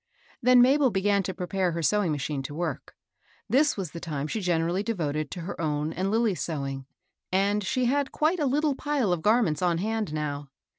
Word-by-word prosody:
Then 250 0 +6
Mabel 270 +1 +4
began 200 0 +2
to 190 0 -4
prepare 180 0 -1
her 165 0 -3
sewing 205 0 +2
machine 145 -1 -2
to 145 +2 -7
work. 160 -5 -4 0.5
This 280 +5 +3
was 185 -6 -4
the 170 - -7
time 150 -4 -4
she 210 +8 -3
gen 175 -3 +1
erally 175 +4 0
devoted 155 -9 -2
to 175 - -6
her 170 0 -6
own 150 0 -1
and 190 +2 -1
Lilly's 220 -3 +1
sewing, 135 -4 -4 0.4
and 200 +2 +2
she 250 +6 0
had 275 +2 +1
quite 325 +4 +1
a 295 - +1
little 295 +2 +2
pile 270 -8 0
of 170 - -2
garments 210 -7 +2
on 175 -2 +2
hand 215 -1 -2
now. 145 -2 -4
185 Hz, 200 wpm, -27 LUFS, 155-230 Hz, 0.5 s, Then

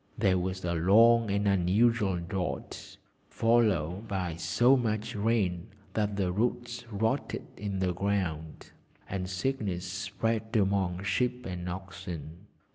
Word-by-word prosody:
There 95 -1 +3
was 95 0 -3
a 85 - 0
long 110 +7 +5
and 100 +1 +1
unusual 100 +2 +3
drought, 90 +1 -5 0.3
followed 105 -5 +2
by 90 -5 -2
so 90 +11 +3
much 110 -4 -1
rain 100 -4 0 0.3
that 105 -2 0
the 95 -3 0
roots 120 +3 -2
rotted 110 +1 -1
in 100 -1 -4
the 95 -1 0
ground, 90 -5 -2 0.4
and 90 -1 -3
sickness 95 -3 -2
spread 110 +4 -2
amongst 95 -2 +1
sheep 125 0 0
and 90 -1 -4
oxen. 90 -1 -7
100 Hz, 120 wpm, -29 LUFS, 90-110 Hz, 0.4 s, long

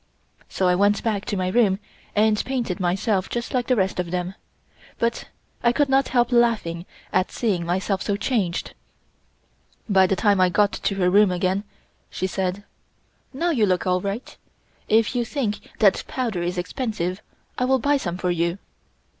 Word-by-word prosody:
So 185 - 0
I 180 - +4
went 205 +2 +2
back 210 -3 -1
to 205 - -2
my 185 0 0
room 200 -2 +3 0.4
and 215 0 +3
painted 245 -9 -2
myself 185 +2 0
just 240 0 -4
like 250 -2 0
the 255 - +3
rest 190 -4 0
of 180 -1 -2
them, 180 +1 -2 0.6
but 235 0 -1 0.3
I 235 - +4
could 285 +3 +1
not 270 0 +3
help 245 -1 +2
laughing 220 -8 +1 0.3
at 185 0 +1
seeing 190 -8 -1
myself 190 +2 -1
so 200 -1 -1
changed. 205 -6 -1 1.1
By 190 -3 +4
the 195 - +1
time 200 -2 +3
I 185 - +5
got 205 +3 +3
to 200 - -2
her 180 -2 +2
room 205 +1 +5
again, 185 +3 0 0.4
she - - -3
said: 190 +1 -2 0.7
"Now 335 +6 0
you 225 -9 +2
look 185 0 +1
all 180 0 +1
right. 200 +6 -5 0.5
If 220 +1 +3
you 245 - +1
think 230 -4 -2 0.2
that 200 -4 +4
powder 230 -9 -2
is 175 +1 -2
expensive, 185 -1 -3 0.4
I 250 - +2
will 265 +1 +3
buy 285 +3 +2
some 180 -9 -4
for 180 -1 -1
you." 170 +1 0
200 Hz, 175 wpm, -23 LUFS, 185-235 Hz, 1.1 s, I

